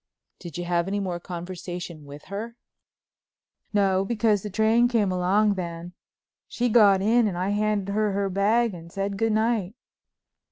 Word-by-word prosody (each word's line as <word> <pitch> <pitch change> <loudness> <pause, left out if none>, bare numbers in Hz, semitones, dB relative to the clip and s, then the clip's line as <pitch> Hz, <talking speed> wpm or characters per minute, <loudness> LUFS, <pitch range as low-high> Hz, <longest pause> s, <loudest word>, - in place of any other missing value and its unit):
'" - - -55
"Did 170 -4 -8
you 175 - -4
have 175 0 0
any 200 +1 -1
more 180 -3 -3
conversation 175 -2 -7
with 145 +1 -11
her?" 220 +4 -6 1.2
"No, 195 -2 +2
because 215 -1 +1
the 210 - -6
train 220 +4 +3
came 220 -6 +1
along 195 +4 +2
then. 175 -2 -6 0.5
She 245 0 -1
got 205 -4 +5
in 230 +2 +3
and 185 -4 -3
I 185 +2 -1
handed 205 -1 0
her 215 0 +1
her 200 0 0
bag 210 +4 +1
and 170 -1 -11
said 195 +1 -3
'Good 225 +2 0
night.'" 220 -2 0
200 Hz, 165 wpm, -25 LUFS, 180-215 Hz, 1.2 s, got